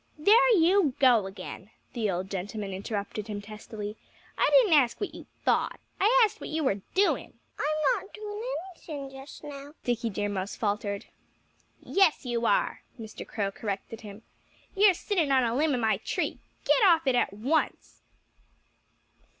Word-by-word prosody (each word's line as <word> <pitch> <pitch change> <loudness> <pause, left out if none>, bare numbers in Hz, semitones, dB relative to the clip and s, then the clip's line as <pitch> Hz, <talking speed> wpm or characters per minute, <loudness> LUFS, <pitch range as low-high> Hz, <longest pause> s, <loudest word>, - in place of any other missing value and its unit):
"There 450 +10 +6
you 340 -4 +4
go 245 -8 +4
again!" 195 +1 -9 0.2
the 220 -3 -1
old 185 +1 -3
gentleman 200 +1 -4
interrupted 205 +2 -4
him 210 -2 -4
testily. 210 0 -8 0.4
"I - - +3
didn't 470 -9 +6
ask 260 -6 +4
you - - 0
what - - -12
you - - -11 0.2
thought. - - +1 0.2
I 480 +5 +5
asked 430 +1 -5
you - - -27
what - - -7
you 315 0 -1
were 200 -7 0
doing." 400 +2 +1 0.2
"I'm 305 -1 +1
not 395 - -18
doing 420 0 -7 0.3
anything 285 -5 -8
just 270 +3 -11
now," 290 0 -9
Dickie 240 -1 -1
Deer 205 0 -2
Mouse 200 -1 -3
faltered. 205 -2 -2 0.7
"Yes, 380 -8 +2
you 235 -1 0
are!" - - +1 0.2
Mr. 220 -1 -8
Crow 200 -3 -2
corrected 205 +2 -5
him. 210 0 -10 0.5
"You're 395 -1 +6
sitting 345 -6 0
on 260 -1 +4
a 230 -1 0
limb 295 0 +2
of - - -1
my 220 -1 +2
tree.... - - -3 0.3
Get - - +4
off 335 -5 +5
it 265 - +3
at 245 - +2
once!" 265 +10 -1
255 Hz, 165 wpm, -28 LUFS, 210-325 Hz, 0.7 s, There